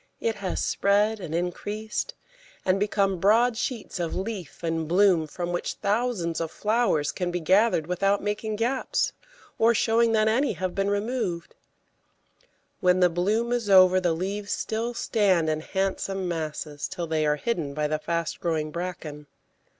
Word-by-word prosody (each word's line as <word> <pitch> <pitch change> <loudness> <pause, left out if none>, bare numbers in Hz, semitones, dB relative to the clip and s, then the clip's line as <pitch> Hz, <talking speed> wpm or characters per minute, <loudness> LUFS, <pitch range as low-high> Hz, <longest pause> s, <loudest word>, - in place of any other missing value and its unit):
It 225 -2 -1
has 190 -3 -2
spread 210 +2 +2
and 165 -4 -5
increased 210 - -3 0.5
and 190 +1 +2
become 200 -2 +1
broad 225 +5 +4
sheets 235 -5 -4
of 170 -2 -2
leaf 190 -5 -5
and 165 -1 -1
bloom, 180 -2 +4
from 175 +3 -4
which 175 - -2
thousands 200 -6 -1
of 165 - -2
flowers 210 -8 +1
can 180 -1 -2
be 175 0 -2
gathered 190 0 +3
without 195 +4 +1
making 210 +1 -2
gaps, 245 +5 0 0.5
or 230 +1 +4
showing 225 +2 +3
that 215 0 +3
any 250 +5 +2
have 185 0 -3
been 195 0 0
removed; 205 -5 -2 1.3
when 180 -2 +3
the 180 -1 +5
bloom 210 +7 0
is 240 -4 -1
over 185 -1 +7
the 175 -2 +2
leaves 200 +4 -3
still 230 +2 -2
stand 190 -10 +2
in 155 - -1
handsome 195 +1 -2
masses 155 -3 -4
till 175 - -4
they 160 -1 0
are 150 - +3
hidden 155 -7 -2
by 150 0 0
the 155 0 -1
fast 170 0 -2
growing 155 -2 -1
bracken. 160 -4 -6
190 Hz, 160 wpm, -26 LUFS, 170-215 Hz, 1.3 s, over